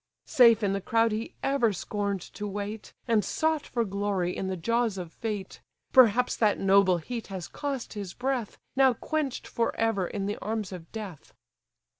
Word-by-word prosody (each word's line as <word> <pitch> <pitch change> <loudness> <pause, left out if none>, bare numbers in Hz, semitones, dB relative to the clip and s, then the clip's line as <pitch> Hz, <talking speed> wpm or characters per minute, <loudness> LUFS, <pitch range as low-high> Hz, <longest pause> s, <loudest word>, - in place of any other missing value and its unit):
Safe 235 -7 +6
in 195 -1 +2
the 195 - -2
crowd 225 +3 +2
he 220 +2 -4
ever 275 -5 +2
scorn'd 200 0 -2
to 210 - -4
wait, 205 +2 -5 0.2
And 225 -3 +3
sought 315 -2 0
for 235 -2 0
glory 195 -3 -1
in 190 - -3
the 190 -1 -2
jaws 230 +3 0
of 175 -3 -6
fate: 210 -4 -5 0.3
Perhaps 250 -1 +5
that 215 -2 +3
noble 195 -2 +4
heat 230 +7 -6
has 185 -3 -6
cost 280 -4 -4
his 200 -5 -6
breath, 250 -3 -2 0.2
Now 265 -2 +5
quench'd 305 0 -2
for 230 - -1
ever 225 -5 +1
in 195 +1 -3
the 205 +1 -2
arms 215 -2 -3
of 175 -3 -9
death." 205 -9 -8
210 Hz, 175 wpm, -28 LUFS, 195-235 Hz, 0.3 s, Safe